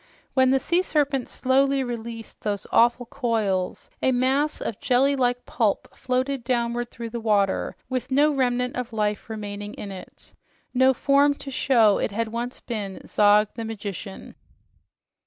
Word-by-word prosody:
When 260 -1 +4
the 270 +1 +4
sea 345 +6 +1
serpent 285 -7 0
slowly 270 +1 +2
released 230 -2 -7
those 205 -2 -2
awful 240 +1 +4
coils, 220 -8 -1
a 260 - +3
mass 265 +4 +1
of 215 - -4
jelly 270 +2 +3
like 245 -2 0
pulp 220 -4 -1
floated 260 0 -1
downward 240 -1 -1
through 230 -1 -7
the 235 - -4
water 205 -3 +1
with 255 -1 -3
no 290 +3 +4
remnant 250 -2 0
of 250 -1 -4
life 210 0 -1
remaining 205 -1 -6
in 200 - -7
it, 190 - -11 0.4
no 260 +1 +4
form 280 +2 +3
to 275 - -8
show 230 -6 +4
it - - 0
had 220 +2 -2
once 240 +2 -4
been 205 -5 -5
Zog, 210 0 +4
the 230 - -5
Magician. 205 -3 -7
240 Hz, 155 wpm, -24 LUFS, 215-260 Hz, 0.4 s, When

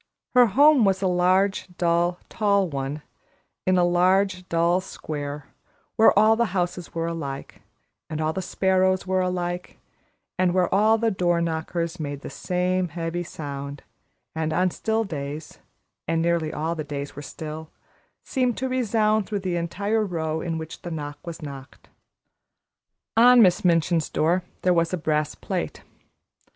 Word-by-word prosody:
Her 250 -1 +7
home 280 +4 +5
was 195 -1 +2
a - - +3
large, 185 +2 +2
dull, 175 0 +1
tall 200 -3 +1
one, 140 0 -4 0.6
in 185 0 +4
a 180 - +4
large, 185 +1 +2
dull 170 +2 +2
square, 145 -5 -6 0.4
where 220 - +6
all 215 +2 +6
the 225 -5 -1
houses 175 -1 -3
were 165 0 -1
alike, 145 -5 -5 0.5
and 155 -1 -4
all 155 0 0
the 190 - -3
sparrows 185 0 +1
were 185 0 +1
alike, 180 -1 -3 0.6
and 180 -1 +2
where 185 -1 +2
all 215 +3 +4
the 225 0 +1
door 175 -3 +1
knockers 170 +1 -2
made 145 -2 -4
the - - -8
same 180 0 -1
heavy 165 +1 -3
sound, 140 -4 -7 0.5
and 160 0 -2
on 180 +3 +2
still 220 +4 -1
days 150 -4 -6 0.5
and 165 +1 +1
nearly 165 -2 +1
all 160 +2 -2
the 160 -2 -4
days 145 -1 -6
were 145 - -7
still 155 +1 -7 0.5
seemed 250 -3 0
to 260 - -1
resound 220 -4 +1
through 205 -2 -3
the 185 -2 -2
entire 200 +6 -1
row 160 -4 -2
in 165 -2 -3
which 160 -1 -7
the 175 - -6
knock 145 -3 -5
was 165 -1 -7
knocked. 140 -1 -10 1.3
On 245 +2 +7
Miss 185 -5 +5
Minchin's 165 -2 +2
door 170 +4 +1 0.2
there 180 - +4
was 170 -1 +1
a - - +1
brass 155 -2 -1
plate. - - -4
175 Hz, 155 wpm, -24 LUFS, 160-190 Hz, 1.3 s, Her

